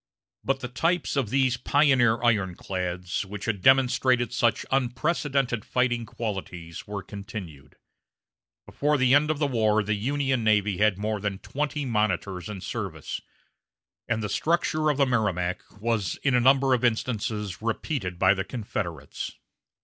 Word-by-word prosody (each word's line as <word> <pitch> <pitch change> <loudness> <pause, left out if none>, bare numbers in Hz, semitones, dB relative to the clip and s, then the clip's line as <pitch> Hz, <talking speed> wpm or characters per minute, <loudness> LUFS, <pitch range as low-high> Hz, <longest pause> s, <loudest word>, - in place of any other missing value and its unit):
But 135 -1 0
the 125 - -3
types 165 +9 0
of 135 -7 0
these 130 0 +2
pioneer 125 -5 +3
ironclads, 90 -4 -1
which 100 0 -7
had 105 -4 -1
demonstrated 130 -2 +3
such 120 -2 +1
unprecedented 135 - 0
fighting 120 -2 0
qualities, 90 -7 -6
were 100 -1 -5
continued. 100 -8 -9 0.9
Before 150 +1 0
the 130 -1 +4
end 150 +2 +4
of 155 - +1
the 150 - +1
war 110 -5 +2
the 105 +1 0
Union 130 +3 0
navy 105 -3 +2
had 105 -2 +3
more 105 +1 -2
than 100 -1 -2
twenty 145 +5 -3
monitors 100 -5 -1
in 100 -3 -6
service; 95 - -5 0.9
and 115 -1 -1
the - - -1
structure 155 +3 +1
of 145 - +1
the 140 - +4
Merrimac 100 -8 0 0.2
was 110 -5 0
in 135 - +2
a 125 - +5
number 135 +1 +4
of 125 -1 +1
instances 110 -4 -1
repeated 115 - -2
by 95 +1 +5
the 95 -1 -2
Confederates. 95 - -5
115 Hz, 145 wpm, -26 LUFS, 100-130 Hz, 0.9 s, a